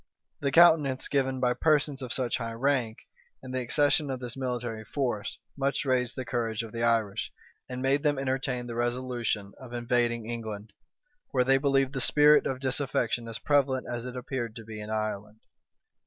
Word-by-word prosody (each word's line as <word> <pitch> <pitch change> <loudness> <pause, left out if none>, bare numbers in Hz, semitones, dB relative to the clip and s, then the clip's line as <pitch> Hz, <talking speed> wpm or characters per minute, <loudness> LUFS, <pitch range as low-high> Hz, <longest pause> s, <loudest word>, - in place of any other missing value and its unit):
The 140 -1 0
countenance 155 -5 +5
given 135 -2 0
by 125 -1 +2
persons 145 -1 +2
of 125 -2 -5
such 125 -2 -1
high 115 -1 -4
rank, 125 -3 0 0.5
and 130 -1 -7
the 130 - 0
accession 145 +4 +2
of 130 -1 -3
this 125 -2 -5
military 120 -4 -3
force, 120 -3 -2 0.2
much 140 +1 -1
raised 125 -1 +1
the 130 - -4
courage 115 -2 -2
of 115 - -8
the 115 - -4
Irish, 115 -4 +1 0.4
and 125 0 -4
made 135 +2 +2
them 145 -2 +1
entertain 130 -2 -1
the 120 - -6
resolution 120 -4 -2
of 125 -2 -10
invading 120 -1 0
England, 110 -3 -6 0.6
where 130 -2 +2
they 135 +1 +4
believed 135 -1 +2
the 135 - -2
spirit 150 +3 +5
of 130 -1 -3
disaffection 125 -3 -1
as 115 -1 -5
prevalent 135 -3 +1
as 120 +1 -4
it 125 - -7
appeared 120 -3 -4
to 115 - -9
be 110 -1 -7
in 105 - -7
Ireland. 110 0 -3
125 Hz, 180 wpm, -28 LUFS, 115-135 Hz, 0.6 s, countenance